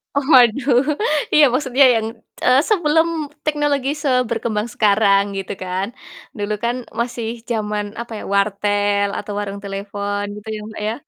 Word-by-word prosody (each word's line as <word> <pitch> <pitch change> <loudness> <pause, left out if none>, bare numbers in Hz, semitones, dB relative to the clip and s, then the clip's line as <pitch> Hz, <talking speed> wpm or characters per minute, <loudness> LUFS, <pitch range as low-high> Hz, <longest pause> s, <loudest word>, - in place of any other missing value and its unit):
Waduh, 265 -2 +4 0.5
iya 300 - +7
maksudnya 265 0 +3
yang, 220 -1 0 0.3
t - - -14
eee, 255 +2 +5
sebelum 325 -5 +3 0.4
teknologi 295 -3 0
seberkembang 235 -4 0
sekarang 200 -2 +4
gitu 195 -1 -5
kan, 185 +1 -2 0.5
dulu 205 0 -2
kan 235 +1 +1 0.2
masih 235 -1 -2 0.2
jaman 210 -2 -1 0.2
apa 235 - -9
ya - - -8
wartel 205 0 +1
atau - - -6
warung 200 -1 -5
telepon 200 +1 -4
gitu 210 +1 -11
ya - - -5
Mbak 220 - -8
ya. - - -1
220 Hz, 140 wpm, -20 LUFS, 205-255 Hz, 0.5 s, iya